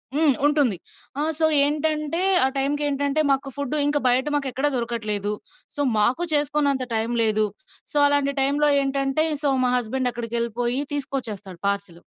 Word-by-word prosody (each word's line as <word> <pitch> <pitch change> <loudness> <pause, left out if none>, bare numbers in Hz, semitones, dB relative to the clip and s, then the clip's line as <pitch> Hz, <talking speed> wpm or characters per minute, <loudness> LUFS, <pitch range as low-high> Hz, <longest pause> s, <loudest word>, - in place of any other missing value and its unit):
హ్మ్. 305 -3 +3
ఉంటుంది. 285 - +2 0.4
ఆ! - - 0 0.2
సో 320 - +2 0.2
ఏంటంటే 305 +2 0 0.3
ఆ - - +3
టైంకేంటంటే 285 +1 0
మాకు 275 0 0
ఫుడ్ 285 +1 -3
ఇంకా 290 0 +1
బయట 250 +2 +2
మాకెక్కడా 275 0 0
దొరకట్లేదు. 215 -4 -1 0.4
సో 290 - -2 0.2
మాకు 250 +11 +1
చేసుకోన్నంత 290 -2 +1
టైం 225 +2 -1
లేదు. 215 -1 +2 0.5
సో 295 - -2
అలాంటి 285 -1 +1
టైంలో 290 +2 +2
ఏంటంటే 275 +2 0 0.2
సో 285 - +1
మా 250 - +2
హస్బెండ్ 250 +2 -1
అక్కడికెళ్ళిపోయి 235 +1 -2
తీసుకొచ్చేస్తాడు 220 -10 -4
పార్సెలు. 200 -4 -3
270 Hz, 140 wpm, -23 LUFS, 235-290 Hz, 0.5 s, హ్మ్